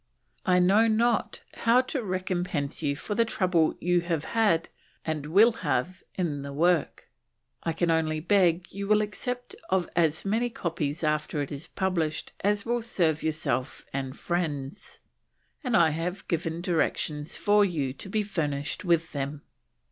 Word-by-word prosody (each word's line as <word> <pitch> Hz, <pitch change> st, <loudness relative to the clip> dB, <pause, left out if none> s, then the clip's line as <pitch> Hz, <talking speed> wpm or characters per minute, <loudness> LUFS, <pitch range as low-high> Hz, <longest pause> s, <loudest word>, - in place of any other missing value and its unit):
I 180 Hz, -1 st, +5 dB
know 195 Hz, +5 st, +5 dB
not 225 Hz, 0 st, +1 dB
how 235 Hz, +2 st, +4 dB
to 260 Hz, +1 st, -3 dB
recompense 180 Hz, -7 st, -2 dB
you 140 Hz, -2 st, 0 dB
for 205 Hz, -, -4 dB
the 230 Hz, -, +3 dB
trouble 180 Hz, -7 st, +1 dB
you 175 Hz, 0 st, +2 dB
have 165 Hz, -3 st, -1 dB
had 205 Hz, -8 st, +2 dB, 0.4 s
and 155 Hz, -2 st, -2 dB
will 205 Hz, +9 st, +6 dB
have 155 Hz, +4 st, -1 dB
in 155 Hz, -6 st, -1 dB
the 140 Hz, 0 st, -6 dB
work. 170 Hz, +3 st, +1 dB, 0.5 s
I 165 Hz, -, -1 dB
can 170 Hz, +1 st, +1 dB
only 160 Hz, -1 st, +1 dB
beg 180 Hz, 0 st, +3 dB
you 200 Hz, +1 st, -5 dB
will 215 Hz, 0 st, +4 dB
accept 245 Hz, +4 st, -4 dB, 0.2 s
of 185 Hz, -2 st, +1 dB
as 160 Hz, 0 st, +2 dB
many 225 Hz, +5 st, +1 dB
copies 165 Hz, -7 st, -3 dB
after 150 Hz, -1 st, 0 dB
it 140 Hz, -, -7 dB
is 145 Hz, +1 st, -6 dB
published 170 Hz, -5 st, -2 dB
as 205 Hz, 0 st, +1 dB
will 240 Hz, +1 st, 0 dB
serve 165 Hz, -9 st, +1 dB
yourself 140 Hz, -5 st, -2 dB
and 135 Hz, 0 st, -3 dB
friends, 160 Hz, -2 st, -3 dB, 0.7 s
and 250 Hz, -5 st, +2 dB
I 165 Hz, -2 st, +5 dB
have 175 Hz, +5 st, -4 dB
given 165 Hz, -1 st, -2 dB
directions 160 Hz, -3 st, -1 dB
for 205 Hz, 0 st, +4 dB
you 150 Hz, -9 st, -1 dB
to 190 Hz, -, -7 dB
be 215 Hz, +2 st, 0 dB
furnished 150 Hz, -8 st, -2 dB
with 170 Hz, -2 st, +2 dB
them. 145 Hz, +1 st, -4 dB
170 Hz, 155 wpm, -27 LUFS, 155-200 Hz, 0.7 s, will